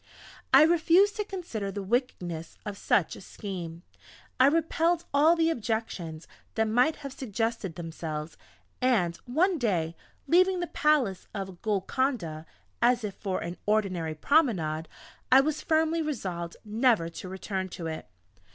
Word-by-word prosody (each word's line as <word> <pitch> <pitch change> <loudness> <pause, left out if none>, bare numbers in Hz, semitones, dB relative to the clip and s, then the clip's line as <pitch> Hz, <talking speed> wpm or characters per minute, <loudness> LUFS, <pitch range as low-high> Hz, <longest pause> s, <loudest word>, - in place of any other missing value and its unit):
I - - +9
refused 345 +5 +4
to 420 - 0
consider 345 - -5
the 200 +1 -5
wickedness 185 -7 -2
of 205 -1 -4
such 195 -3 +1
a - - -11
scheme. 175 -4 -7 0.6
I 260 - +7
repelled 330 +2 +2
all 305 +4 +5
the 330 -1 +2
objections 210 - -3 0.3
that 220 -1 +2
might 250 +8 +3
have 275 - -5
suggested 225 - -3
themselves, 160 -2 -5 0.5
and 210 -10 +2
one 330 +8 +2
day, 170 -9 0 0.3
leaving 365 +4 +4
the 350 - -1
palace 290 - +1
of 190 -3 -6
Golconda 205 - -1 0.3
as 240 0 +3
if 205 -2 -3
for 190 -1 -3
an 175 +1 -5
ordinary 185 -7 0
promenade, 165 - +2 0.4
I 260 - +9
was 305 +2 -1
firmly 320 +1 +2
resolved 185 - -4
never 220 -4 +2
to 170 +2 -8
return 190 0 -4
to 170 - -7
it. 160 -1 -5
220 Hz, 140 wpm, -28 LUFS, -, 0.6 s, I